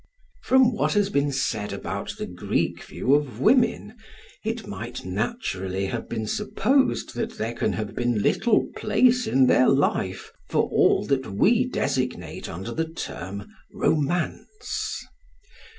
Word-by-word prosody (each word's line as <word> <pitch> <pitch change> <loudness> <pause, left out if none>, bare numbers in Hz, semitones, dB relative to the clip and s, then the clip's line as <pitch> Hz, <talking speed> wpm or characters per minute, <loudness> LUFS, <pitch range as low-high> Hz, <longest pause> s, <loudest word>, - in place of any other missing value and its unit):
From 260 -2 +4
what - - 0
has 205 -1 +2
been 140 -2 +1
said 110 -6 -1
about - - -4
the - - -3
Greek - - -2
view 130 - 0
of 140 -6 +1
women, 230 - +2 0.5
it 220 0 -3
might 120 +5 -6
naturally 95 - -2
have 115 +4 -4
been 110 -2 -3
supposed 220 - +1
that 225 0 -4
there 115 +2 -2
can - - -1
have 110 -1 -4
been 120 -4 0
little 220 +1 +3
place 240 +3 +3
in 135 -7 +4
their 125 0 +5
life 115 -8 0 0.2
for - - +2
all - - +3
that 130 -1 -1
we 235 - +3
designate 130 - -2
under 95 +8 -6
the 160 0 -2
term 100 - -6 0.3
"romance." 175 - -1
140 Hz, 135 wpm, -25 LUFS, -, 0.5 s, their